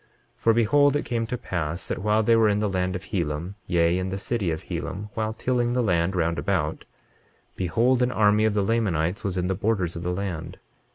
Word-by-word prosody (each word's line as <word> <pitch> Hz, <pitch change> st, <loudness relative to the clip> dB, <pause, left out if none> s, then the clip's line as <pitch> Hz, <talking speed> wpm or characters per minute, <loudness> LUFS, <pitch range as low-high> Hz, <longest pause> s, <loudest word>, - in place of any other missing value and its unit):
23:25 -, -, -41 dB
For 115 Hz, -, +3 dB
behold, 145 Hz, +5 st, +4 dB
it 145 Hz, -, -1 dB
came 115 Hz, -2 st, -1 dB
to 125 Hz, -, -3 dB
pass 85 Hz, -4 st, -3 dB
that -, -, -3 dB
while 105 Hz, +3 st, +2 dB
they 115 Hz, +2 st, +4 dB
were 110 Hz, -1 st, +4 dB
in 100 Hz, -, +2 dB
the 105 Hz, 0 st, 0 dB
land 90 Hz, -1 st, -1 dB
of 90 Hz, -, -5 dB
Helam, 85 Hz, 0 st, -3 dB
yea, 85 Hz, 0 st, +2 dB
in 95 Hz, 0 st, -2 dB
the 95 Hz, -, -3 dB
city 100 Hz, -2 st, -1 dB
of 80 Hz, -1 st, -3 dB
Helam, 100 Hz, +3 st, -5 dB
while 110 Hz, -1 st, -1 dB
tilling 120 Hz, +1 st, 0 dB
the 125 Hz, 0 st, +1 dB
land 90 Hz, -2 st, +1 dB
round 85 Hz, -1 st, 0 dB
about, -, -, -1 dB, 0.7 s
behold 120 Hz, +8 st, +2 dB
an 125 Hz, 0 st, +2 dB
army 105 Hz, -1 st, +3 dB
of 110 Hz, -1 st, +1 dB
the 100 Hz, -, +2 dB
Lamanites 95 Hz, -5 st, 0 dB
was 95 Hz, -2 st, -2 dB
in 90 Hz, -, 0 dB
the 95 Hz, -, 0 dB
borders 95 Hz, -3 st, -1 dB
of 85 Hz, -, -5 dB
the 90 Hz, -, -2 dB
land. 90 Hz, -3 st, -4 dB
100 Hz, 225 wpm, -25 LUFS, 90-115 Hz, 0.7 s, behold